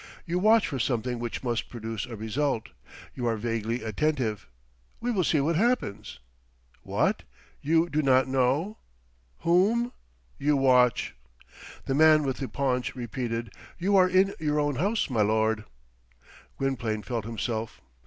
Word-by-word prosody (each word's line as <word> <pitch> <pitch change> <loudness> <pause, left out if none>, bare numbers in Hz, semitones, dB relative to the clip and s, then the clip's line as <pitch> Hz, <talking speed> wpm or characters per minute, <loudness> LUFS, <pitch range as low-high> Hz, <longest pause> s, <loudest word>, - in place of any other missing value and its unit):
You 175 +1 -1
watch 220 +3 +5
for 135 - -3
something 120 0 -1
which 120 +1 -4
must 120 -2 -2
produce 115 -1 -5
a 120 - -7
result. 115 +2 -2 0.4
You 120 -2 -3
are 115 -1 0
vaguely 115 +1 -2
attentive. 110 - -1 0.5
We 245 +2 -1
will 195 -6 +1
see 155 -1 +2
what 160 +3 +1
happens. 235 - -1 0.6
What? - - 0 0.4
You 165 +3 +2
do 155 -2 0
not 130 -2 +4
know. 135 - 0 0.6
Whom? 215 +8 +2 0.5
You 145 +1 +2
watch. 125 -2 +3 0.7
The 135 - -1
man 155 +1 +6
with 135 -2 -2
the 135 - -4
paunch 130 -2 -1
repeated, 120 -2 -4 0.3
"You 195 +3 +1
are 185 -1 +5
in 190 +2 +3
your 150 -1 0
own 145 -3 0
house, 205 - +1
my 120 -6 0
lord." 110 +1 +1 0.9
Gwynplaine 120 -6 -2
felt 115 -4 -3
himself. 115 0 -4
130 Hz, 145 wpm, -27 LUFS, 115-160 Hz, 0.9 s, man